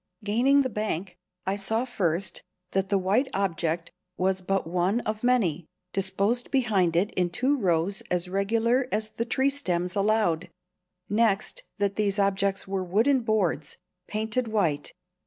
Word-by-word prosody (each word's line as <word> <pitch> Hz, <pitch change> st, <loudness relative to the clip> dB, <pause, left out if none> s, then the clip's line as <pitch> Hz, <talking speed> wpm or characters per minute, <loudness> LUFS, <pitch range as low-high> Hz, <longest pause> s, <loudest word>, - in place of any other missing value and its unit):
Gaining 255 Hz, +7 st, +3 dB
the 260 Hz, -, -1 dB
bank, 195 Hz, -5 st, -3 dB, 0.3 s
I 190 Hz, -, 0 dB
saw, 220 Hz, +4 st, +1 dB
first, 190 Hz, -6 st, -1 dB, 0.3 s
that 195 Hz, 0 st, 0 dB
the 200 Hz, -, +3 dB
white 200 Hz, +8 st, +2 dB
object 170 Hz, -3 st, -1 dB, 0.3 s
was 190 Hz, +1 st, +1 dB
but 195 Hz, +1 st, 0 dB
one 180 Hz, +7 st, +1 dB
of 215 Hz, +1 st, -4 dB
many, 195 Hz, -11 st, +2 dB, 0.3 s
disposed 195 Hz, +5 st, +1 dB
behind 205 Hz, -, +2 dB
it 190 Hz, +5 st, +2 dB
in 180 Hz, -1 st, 0 dB
two 255 Hz, +11 st, +1 dB
rows 185 Hz, -, +1 dB
as 180 Hz, 0 st, 0 dB
regular 230 Hz, +7 st, +1 dB
as 215 Hz, +1 st, 0 dB
the 230 Hz, -, -3 dB
tree 265 Hz, +3 st, +2 dB
stems 180 Hz, -10 st, -1 dB
allowed; 200 Hz, -5 st, +1 dB, 0.6 s
next, 220 Hz, -, +1 dB, 0.2 s
that 200 Hz, -1 st, 0 dB
these 205 Hz, -1 st, +1 dB
objects 195 Hz, -1 st, +1 dB
were 190 Hz, -1 st, -1 dB
wooden 225 Hz, +10 st, +3 dB
boards, 210 Hz, -9 st, 0 dB, 0.3 s
pained 220 Hz, +3 st, -1 dB
white. 170 Hz, -10 st, 0 dB
200 Hz, 145 wpm, -27 LUFS, 180-225 Hz, 0.6 s, Gaining